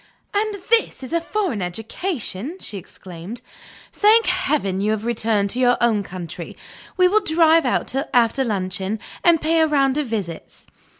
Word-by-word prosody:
"And 420 +1 0 0.2
this 460 -11 +2
is 260 - -7
a 335 - +2
foreign 355 - -2
education!" 225 - -4
she 205 - -7
exclaimed. 185 +4 -10 0.5
"Thank 440 +2 +5
Heaven, 305 - 0
you 210 - +1
have 220 0 -4
returned 215 -4 +1
to 250 - -2
your 245 -1 +4
own 225 -3 +2
country! 180 -4 -8 0.4
We 365 -1 +6
will 415 +4 +4
drive 325 -5 +4
out 250 - -1 0.2
after 245 +2 +3
luncheon, 190 -2 -2 0.3
and 340 -2 +5
pay 325 +2 +1
a 320 - +4
round 275 -2 +2
of 295 - -2
visits." 195 -8 -6
245 Hz, 160 wpm, -21 LUFS, 200-330 Hz, 0.5 s, We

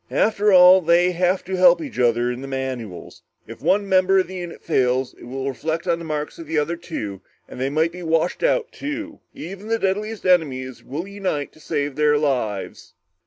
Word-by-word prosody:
After 210 -1 +2
all, 185 0 +8
they 175 +2 +3
have 180 +2 +1
to 190 +1 -4
help 180 -2 +6
each 135 -7 -7
other 120 0 +2
in 125 +1 -6
the 135 - -7
manuals. 130 -8 -6 0.2
If - - -11
one 200 +1 +2
member 190 0 +4
of 190 - +3
the 190 - -9
unit 175 -1 -8
fails, 130 -4 +1
it - - -14
will 135 +2 -5
reflect 160 +5 -3
on 170 -2 0
the 170 - -7
marks 150 0 -4
of 165 - -9
the 160 +1 -2
other 150 +3 0
two 110 - -6 0.3
and 125 - -9
they 135 - 0
might 160 +3 +1
be 180 +1 -9
washed 165 +1 0
out - - +1
too. 300 +1 -6 0.2
Even 195 +6 -8
the 225 0 +1
deadliest 210 +2 -2
enemies 135 -8 +1
will 155 +8 -5
unite 190 -8 -3
to - - -21
save 145 -3 -3
their 150 -1 +3
lives." 125 -9 -2
165 Hz, 205 wpm, -22 LUFS, 135-185 Hz, 0.3 s, all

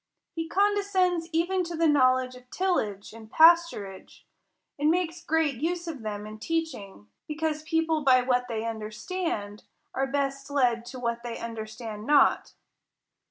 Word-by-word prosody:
He 325 -1 -4
condescends 385 -4 +1
even 355 +3 +1
to 340 0 -5
the 330 0 +3
knowledge 255 -3 +3
of 250 0 -15
till 370 +3 +1
age 205 -1 -6
and 220 -1 -12
pasturage, 325 - +3 0.6
and 295 +1 +3
makes 340 0 -1
great 315 -4 +1
use 345 +2 -1
of 300 -7 -5
them 210 -1 -5
in 215 0 -9
teaching; 220 - -4 0.2
because 310 0 -2
people 320 0 0
by 260 -3 +5
what 250 -1 +1
they 225 -1 -3
understand, 215 - -4 0.3
are 270 +1 0
best 275 0 -2
led 245 -4 +1
to 255 +1 -8
what 235 -1 -2
they 235 -1 -6
understand 220 -1 -7
not. 295 0 +3
275 Hz, 150 wpm, -27 LUFS, 230-330 Hz, 0.6 s, by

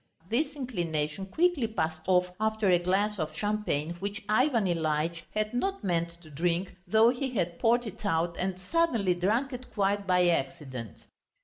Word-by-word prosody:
This 285 +5 0
inclination 175 - -2
quickly 320 - +2
passed 160 -7 -2
off 180 -1 +3
after 220 -2 +2
a 175 - +5
glass 195 +4 +1
of 155 -1 -3
champagne 205 -7 -1
which 200 +3 -4
Ivan 230 0 +3
Ilyitch 165 -1 0
had 215 +1 0
not 385 - -1
meant 170 -3 0
to 155 - -14
drink, 175 +5 -1
though 220 +4 +6
he 265 +2 -1
had 170 -4 -1
poured 240 +1 +3
it 215 0 -8
out 170 -2 0
and 185 0 -2
suddenly 230 - +1
drunk 220 +10 0
it 250 +1 -8
quite 200 -1 0
by 180 -1 +4
accident. 135 - -3
190 Hz, 165 wpm, -29 LUFS, 170-225 Hz, -, though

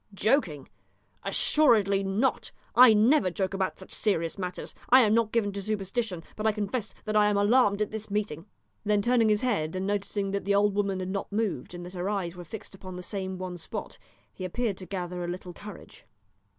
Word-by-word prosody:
"Joking? 185 - +1 0.5
assuredly 215 -10 +3
not! 200 +7 0 0.2
I 250 -1 +9
never 220 0 +4
joke 190 +2 -2
about 190 -1 -1
such 190 - -12
serious 165 -6 0
matters. 180 -1 -5 0.2
I 260 +1 +8
am 215 -3 +4
not 225 -1 +2
given 220 -3 +1
to 200 0 -5
superstition, 200 -2 -3
but 215 +1 -1
I - - +5
confess 210 +1 -3
that 215 -1 -2
I 210 0 +5
am 205 -1 +2
alarmed 205 0 +4
at 210 - -6
this 220 0 -5
meeting!" 200 -4 -3 0.4
Then 210 -1 +2
turning 235 -2 +3
his 210 -1 +2
head, 190 -10 0
and 185 +1 -2
noticing 200 0 -1
that 200 0 -2
the 200 +1 +1
old 205 0 +3
woman 200 -2 0
had 185 - -4
not 195 +1 -4
moved, 200 - -2
and 175 0 -7
that 180 - -9
her 180 +1 -2
eyes 185 -4 -2
were 175 - -8
fixed 200 +5 -9
upon 185 -1 -9
the 180 - -7
same 190 -1 -4
one 180 -1 -6
spot, - - -7 0.3
he 185 - -8
appeared 200 +2 -2
to 185 - -9
gather 180 -1 -4
a - - -3
little 180 0 -6
courage. 205 +2 -11
200 Hz, 205 wpm, -28 LUFS, 185-215 Hz, 0.5 s, I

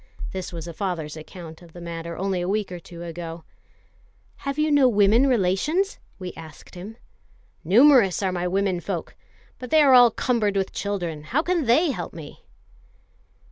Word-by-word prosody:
This 185 -1 -5
was 170 -1 -7
a 170 - -7
father's 160 -5 -4
account 160 +1 -10
of 170 -2 -16
the 175 - -10
matter 170 -1 -6
only 190 -1 -1
a 175 - -2
week 205 -1 -1
or 180 - -6
two 170 0 -11
ago. 165 -1 -7 0.9
"Have 275 +1 -4
you 305 0 +1
no 280 -3 +5
women 215 +4 +4
relations?" 260 - +1 0.2
we 180 -2 -7
asked 160 -1 -12
him. 200 +6 -9 0.7
"Numerous 215 - +5
are 190 - +1
my 180 0 -2
womenfolk, 190 -1 -2 0.5
but 250 - -7
they 310 +2 +5
are 270 -2 +6
all 245 -1 +8
cumbered 220 -3 0
with 190 -1 -1
children: 175 -7 -4
how 285 - 0
can 350 -4 0
they 290 +8 +3
help 175 -9 -6
me?" 155 -3 -10
190 Hz, 170 wpm, -24 LUFS, 170-245 Hz, 0.9 s, all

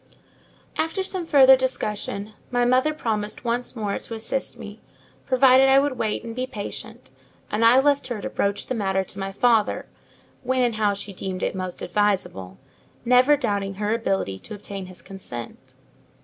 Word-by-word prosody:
After 325 +4 0
some 370 -3 -4
further 265 -3 +8
discussion, 215 -5 -3 0.2
my 245 -1 +1
mother 255 +5 +3
promised 220 -6 -3
once 240 +2 -1
more 210 -3 -2
to 230 - -7
assist 225 +4 -3
me, - - -10 0.5
provided 260 +1 +6
I 270 - +6
would 280 -1 +2
wait 220 -3 -2
and 230 -1 -7
be 255 +1 -2
patient; 205 -5 -7 0.4
and 210 +2 0
I 235 +3 +7
left 285 0 +2
her 240 -4 -4
to - - -4
broach 200 0 -1
the - - -3
matter 190 -4 0
to 195 +1 -8
my 195 0 -3
father, 225 +1 +2 0.6
when 260 0 +1
and 235 -3 0
how 205 -2 +2
she 200 0 -6
deemed 185 0 -4
it - - 0
most 185 -1 -5
advisable: 180 - -1 0.5
never 250 +4 +5
doubting 200 -5 -2
her 210 +2 -1
ability 195 - -1
to 210 - -9
obtain 195 -2 -7
his 185 -1 -13
consent. 125 -12 -9
220 Hz, 170 wpm, -24 LUFS, 200-255 Hz, 0.6 s, further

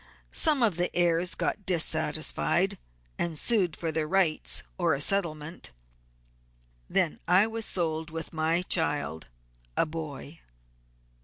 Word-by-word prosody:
Some 295 -5 +4
of 205 -7 +2
the 175 0 +1
heirs 175 0 +2
got 200 - -2
dissatisfied, 180 -4 +1 0.4
and 165 -2 -1
sued 190 -4 +3
for 165 -1 -2
their 155 -1 -1
rights 180 -3 +1 0.2
or - - +2
a - - -5
settlement; 160 -2 -1 1.2
then 75 - +1
I 185 +4 +5
was 225 0 -2
sold 160 -2 -1
with 165 +1 -6
my 160 +2 +1
child, 150 - -1 0.5
a - - +4
boy." 155 -1 -7
165 Hz, 125 wpm, -28 LUFS, 155-185 Hz, 1.2 s, I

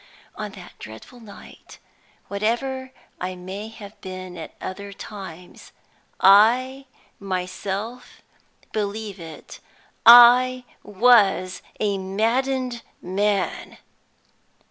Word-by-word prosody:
On 215 -1 -5
that 180 -3 -12
dreadful 110 - -12
night 215 -3 -14 0.5
(whatever 260 +6 -2 0.3
I 185 0 -4
may 190 +4 -7
have 210 -2 -13
been 185 -1 -8
at 160 -2 -9
other 200 +2 -7
times), 190 -4 -11 0.5
I 245 +8 +4 0.3
myself 195 +5 -5 0.5
believe 210 -1 -4
it, 165 -2 -11 0.4
I 245 +2 +8 0.2
was 205 -4 +3 0.2
a 200 -2 0
maddened 240 +5 -1 0.2
man. 195 +1 -2
205 Hz, 85 wpm, -23 LUFS, 190-240 Hz, 0.5 s, I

